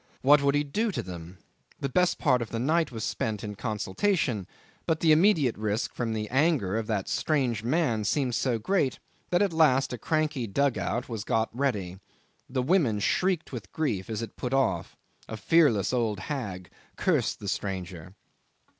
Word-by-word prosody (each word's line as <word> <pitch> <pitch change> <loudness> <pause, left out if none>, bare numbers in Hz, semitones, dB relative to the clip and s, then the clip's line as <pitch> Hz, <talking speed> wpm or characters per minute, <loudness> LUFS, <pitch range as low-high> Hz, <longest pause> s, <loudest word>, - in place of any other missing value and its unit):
What 145 +2 +6
would 140 0 +2
he 145 - +2
do 215 +10 -1
to - - -2
them? 90 0 -9 0.4
The 140 - -1
best 180 +7 +2
part 125 -5 +2
of 115 - -4
the 115 - -4
night 155 +6 +1
was 110 -3 -5
spent 105 0 -2
in 105 -1 -4
consultation; 110 - -1 0.4
but 160 -1 +1
the 160 - +4
immediate 155 - +4
risk 105 +1 -1
from 115 -2 -2
the 105 -1 -3
anger 135 - +2
of 110 -1 -2
that 105 -4 -1
strange 130 -8 0
man 120 -4 +1
seemed 130 +3 0
so 120 0 +1
great 140 - 0 0.3
that 175 +3 +3
at 195 -4 0
last 140 -5 +3
a 125 - -5
cranky 155 -3 -1
dug 140 +5 +1
out 120 - -2
was 115 -4 -4
got 115 0 -1
ready. 100 -9 -1 0.5
The 130 -1 -1
women 135 - +2
shrieked 180 - 0
with 115 -7 -7
grief 115 -12 -2
as 110 0 -3
it 115 - -8
put 125 +1 -2
off. 95 -11 0 0.3
A 110 - -5
fearless 130 - +3
old 110 -5 0
hag 100 - -5 0.2
cursed - - 0
the 100 - -7
stranger. 95 -3 -4
125 Hz, 180 wpm, -27 LUFS, 105-150 Hz, 0.5 s, What